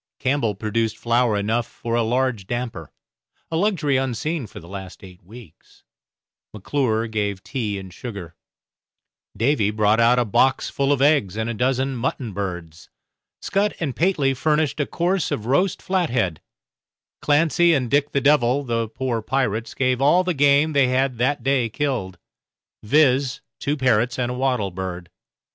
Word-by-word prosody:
Campbell 130 -6 0
produced 110 +1 -2
flour 115 -2 +1
enough 115 +4 -1
for 115 - -6
a 120 - +2
large 120 -3 -1
damper, 120 - -4 0.6
a - - -1
luxury 165 -7 +1
unseen 135 +2 -2
for - - -11
the 85 - -14
last 95 0 -9
eight 90 -2 -13
weeks; 105 -3 -16 0.7
McClure 115 +1 0
gave 105 -3 -3
tea 110 -6 -3
and 95 -2 -9
sugar; 100 -7 -8 1.0
Davy 115 -4 +2
brought 105 +1 +2
out 120 +2 +4
a 125 - +2
box 130 +5 +2
full 140 0 0
of 140 -1 +2
eggs 140 -10 +2
and 110 +1 -1
a - - -4
dozen 130 +3 0
mutton 120 -2 -3
birds; 85 -5 -6 0.5
Scutt 205 +1 0
and 145 -7 -3
Pateley 155 -6 +1
furnished 150 +3 0
a 145 - 0
course 175 0 0
of 110 - -3
roast 165 +9 +1
flathead; 125 - 0 0.8
Clancy 165 +3 +3
and 125 -4 -2
Dick 145 0 +2
the 140 - 0
Devil, 140 -1 +3
the 115 -3 -1
poor 120 0 -3
pirates, 115 -2 -2
gave 130 -1 0
all 165 +6 +4
the 180 -1 -1
game 145 +1 +3
they 140 -2 +4
had 130 -1 0
that 135 +4 0
day 135 -4 +1
killed, 115 -8 -3 0.6
viz., 135 +1 +2 0.2
two 145 +2 -1
parrots 120 -2 +1
and 125 -1 -1
a - - -4
wattle 125 -7 0
bird. 90 -1 -6
125 Hz, 155 wpm, -22 LUFS, 110-140 Hz, 1.0 s, out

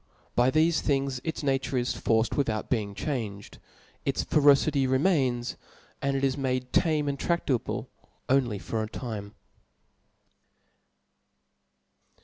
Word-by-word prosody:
By 120 +1 +4
thefe 160 +3 +3
things 135 -3 0
its 160 -1 -4
nature 135 -1 0
is 125 0 0
forced 110 0 +1
witl^out 115 -7 -1
being 105 -5 -1
changed; 110 -9 -4 0.4
its - - 0
ferocity 140 -1 +4
remains 130 -4 +1 0.2
\ - - -30
and 140 0 0
it 135 - -3
is 135 -1 +2
made 130 -2 -2
tamo 155 -3 +2
and 140 -1 -2
tradable 145 -9 -1 0.4
only 130 -5 +2
for 110 +3 -3
a 110 - -4
time. 110 -4 -6
130 Hz, 125 wpm, -28 LUFS, 120-140 Hz, 0.4 s, By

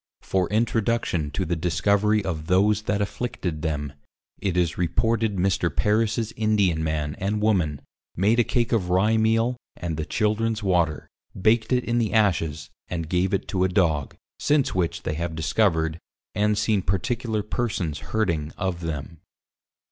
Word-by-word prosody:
For 95 -2 0
introduction 110 -7 0
to - - -2
the 85 - -1
discovery 100 +5 +1
of 80 -4 -3
those 100 +3 +3
that 100 0 +2
afflicted 95 -8 -4
them, 75 -3 -2 0.5
It 95 -3 -1
is 85 -1 +1
reported 110 +4 +1
Mr. 90 -1 +1
Parris's 110 +7 +1
Indian 100 -7 +2
Man, 75 -2 -1
and 105 +2 -1
Woman, 90 -10 +1 0.3
made 105 +6 +3
a - - +6
Cake 120 +1 0
of 100 -7 +1
Rye 100 +5 +3
Meal, 115 +2 +2 0.2
and 85 -4 -4
the 80 - -2
Childrens 110 0 0
water, 85 -5 +1 0.3
baked 110 +4 +2
it 125 -1 +2
in 120 0 0
the 110 -3 0
Ashes, 80 -9 +1 0.2
and 85 -3 -4
gave 90 +2 +1
it 95 - -1
to 95 -2 +1
a 95 - +2
Dog, 80 -7 +1 0.2
since 145 -2 +2
which 90 -3 -1
they 80 - -2
have 85 +1 -3
discovered, 80 -1 +1 0.3
and 105 0 +1
seen 105 -2 +2
particular 110 +4 -1
persons 100 -9 -2
hurting 85 -9 -1
of 95 -3 -2
them. 80 -1 -5
95 Hz, 155 wpm, -24 LUFS, 80-110 Hz, 0.5 s, a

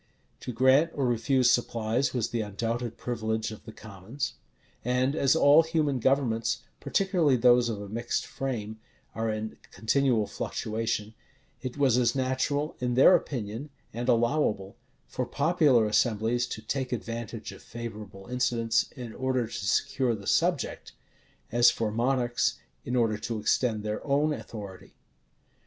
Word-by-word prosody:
To - - -5
grant 130 +7 +4
or 140 - 0
refuse 125 +1 +3
supplies 115 +2 0
was 120 -4 -1
the 115 - -1
undoubted 115 +3 -3
privilege 110 -2 -2
of 110 - -11
the - - -8
commons. 110 +6 -6 0.5
And 125 +3 +1
as 140 -2 +3
all 150 0 +7
human 155 -5 0
governments, 115 -3 +1 0.2
particularly 165 -2 +2
those 120 0 +5
of 110 -3 -3
a 100 - -7
mixed 115 +4 -2
frame, 110 -5 -4 0.3
are 115 0 -2
in 110 0 -4
continual 120 -1 +1
fluctuation, 110 0 -3 0.5
it 130 +2 -5
was 130 -4 +3
as 120 0 +2
natural, 135 +3 -1
in 125 -1 -1
their 135 +8 +7
opinion, 125 -3 -3 0.2
and 120 +2 -3
allowable, 115 -5 +1 0.3
for - - -3
popular 145 -7 +3
assemblies 115 +2 +1
to 110 - -7
take 130 +3 -3
advantage 115 -2 -5
of - - -12
favorable 105 -4 -8
incidents, 115 -2 0
in 120 -3 -7
order 130 -2 0
to 110 - -11
secure 120 +7 +1
the 100 -2 -10
subject, - - 0 0.6
as 120 +1 +6
for 115 -2 -1
monarchs, 120 +1 +1 0.3
in 125 - -3
order 115 -3 +1
to 115 -1 -3
extend 110 0 +1
their 105 0 -3
own 145 +2 +2
authority. 100 -8 -9
120 Hz, 145 wpm, -28 LUFS, 110-130 Hz, 0.6 s, all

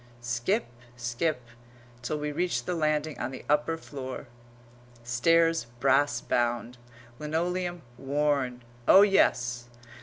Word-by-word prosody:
Skip, 120 - 0 0.3
skip, 125 +3 -1 0.6
till 150 +5 -2
we 150 0 -3
reach 175 +4 -1
the 180 - -1
landing 155 -2 0
on 120 - -2
the 130 - -9
upper 150 +2 +1
floor; 135 -4 -7 0.8
stairs 165 +5 +2
brass 140 +2 +3
bound; 120 0 -1 0.4
linoleum 175 +2 -2 0.2
worn; 135 -3 0 0.2
oh, 195 - +9
yes! 120 -11 +2
145 Hz, 110 wpm, -28 LUFS, 125-165 Hz, 0.8 s, oh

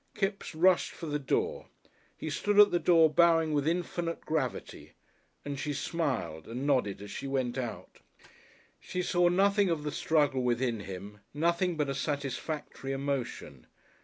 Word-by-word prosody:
Kipps 195 -4 -2
rushed 180 +2 +4
for - - -8
the 150 -1 -2
door. 135 - -1 0.5
He 155 - -5
stood 205 +7 +1
at 205 0 +8
the 175 - +2
door 165 -3 +5
bowing 165 0 +4
with 145 0 +1
infinite 170 0 -2
gravity, 150 -6 -3 0.5
and 140 -1 -4
she 150 - -2
smiled 140 - -2
and 125 +4 -4
nodded 115 -9 +1
as 105 - -9
she 140 - -5
went 130 -3 -1
out. 125 -4 -6 0.8
She 180 - -4
saw 175 0 +3
nothing 200 +2 +3
of 160 -3 -1
the 150 - -2
struggle 145 -5 +1
within 120 -1 0
him, 100 +2 -8 0.2
nothing 170 +2 +1
but 150 -2 0
a 140 - -1
satisfactory 140 0 -4
emotion. 135 - -4
150 Hz, 155 wpm, -30 LUFS, 130-170 Hz, 0.8 s, at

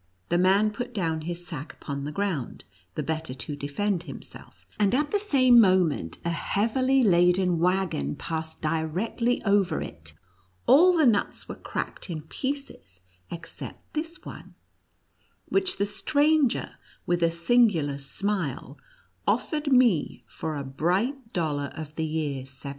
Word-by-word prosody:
The 175 - +2
man 195 +4 +4
put 245 +2 -6
down 165 -5 -1
his 175 +2 -5
sack 155 -2 -7
upon 140 -1 -5
the 150 - -4
ground, 175 -8 -3 0.3
the - - -2
better 160 -4 -3
to 140 +3 -3
defend 165 +7 -1
himself, 145 -6 -12
and 210 +3 +3
at 295 +2 0
the 410 - +2
same 260 - +5
moment, 180 - +2
a 170 - +1
heavily 255 +9 +1
laden 180 -2 +4
wagon 175 - +1
passed 160 -1 -5
directly 170 +10 0
over 200 -3 +2
it; 80 -2 -8 0.5
all 350 +5 +6
the 315 - +5
nuts 220 -5 +1
were - - -5
cracked - - -5
in 155 -3 -4
pieces 160 - -6 0.3
except 170 0 -9
this 325 +3 -5
one, - - -10 0.9
which 380 -1 +1
the 200 - +1
stranger, 295 +4 +1 0.3
with 175 -2 0
a 170 - +4
singular 170 - +2
smile, 170 0 -3 0.5
offered 300 -2 0
me, 240 - +3
for 160 -2 -5
a 140 - -3
bright 195 - -1
dollar 145 -5 -1
of 155 -1 -7
the 160 0 -2
year 155 -3 -2
1720. 130 - -7
180 Hz, 140 wpm, -26 LUFS, 155-235 Hz, 0.9 s, all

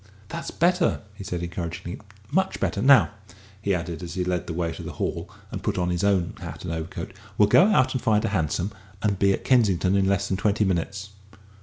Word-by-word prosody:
"That's 165 0 -5
better," 175 +1 +2
he 100 0 -9
said 90 -2 -4
encouragingly; 85 +1 -5 0.3
"much 190 +5 +1
better. - - -1
Now," 135 0 +6 0.5
he 100 -2 +1
added, 85 -1 -4
as 85 -1 -6
he 90 - 0
led 90 -2 -1
the 85 - -3
way 85 0 -1
to - - -7
the - - -6
hall - - -3 0.2
and - - -5
put - - -1
on 90 -1 +1
his 90 +1 -1
own 95 -4 +2
hat - - -7
and 80 - -3
overcoat, 85 +3 -5 0.2
"we'll 105 - +6
go 175 - +6
out 130 -11 +3
and 130 - -1
find 105 0 +2
a - - 0
hansom 90 +1 -1 0.3
and 100 -3 +1
be 100 0 +4
at - - -1
Kensington 100 -7 +3
in 95 -1 +3
less 100 0 +1
than 95 - -1
twenty 105 +1 +2
minutes." 95 +2 -2
95 Hz, 215 wpm, -25 LUFS, 85-105 Hz, 0.5 s, Now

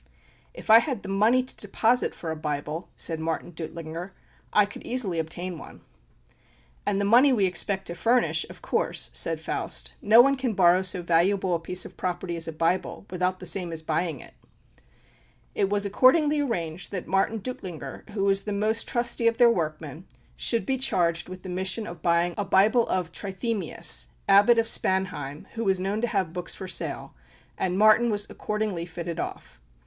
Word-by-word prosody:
"If - - -2
I 225 - +10
had 255 -5 -3
the - - -7
money 220 +6 +3
to 255 - -4
deposit 225 +4 0
for 165 - -5
a - - -3
Bible," 150 +2 -4
said 165 -2 -2
Martin 165 +2 -3
Duttlinger, 165 +2 -7 0.4
"I 210 - +5
could 205 - -11
easily 215 -9 -1
obtain 170 +2 -4
one." - - -12 1.1
"And 200 -1 +1
the 200 - 0
money 245 +7 +6
we 215 -6 +3
expect 190 +2 0
to 170 - -1
furnish, 235 +8 +2
of - - -13
course," - - 0
said - - 0
Faust. - - -4
"No 220 +3 +6
one 275 +3 +6
can 255 -3 -1
borrow 180 0 +5
so 185 -1 -1
valuable 180 +3 +2
a 170 - +1
piece 180 +2 0
of - - -12
property 175 -1 -3
as 165 0 -3
a - - -3
Bible, 165 +5 -1
without 185 0 -1
the 180 - -9
same 180 -2 0
as 160 -1 -4
buying 160 -2 -1
it." - - -12 1.2
It 195 - 0
was 205 0 +1
accordingly 290 +8 +4
arranged 175 - -3
that 185 -3 -5
Martin 195 +4 +1
Duttlinger, 195 -8 -7
who 205 -2 -3
was 195 0 +2
the 210 - -5
most 215 +3 +1
trusty 240 -1 0
of 230 0 +2
their 240 -1 +6
workmen, 155 -2 -4 0.3
should 230 -1 0
be 265 -1 0
charged 170 -9 0
with 185 0 -9
the - - -8
mission 190 +4 -2
of 175 -5 -9
buying 170 +1 +2
a - - +1
Bible 210 +5 +3
of 180 -3 -1
Trithemius, 190 - -1 0.2
Abbot 205 +4 +6
of 230 - +3
Spanheim, 185 -9 -1
who 230 - -3
was 190 -3 +1
known 195 +3 -2
to 240 - +1
have 190 -7 -1
books 180 -1 -3
for 190 - -7
sale; - - -3 0.4
and 185 0 -1
Martin 215 +3 +5
was 205 -1 0
accordingly 210 -5 -3
fitted 170 -1 -6
off. - - -7
190 Hz, 185 wpm, -26 LUFS, 170-220 Hz, 1.2 s, I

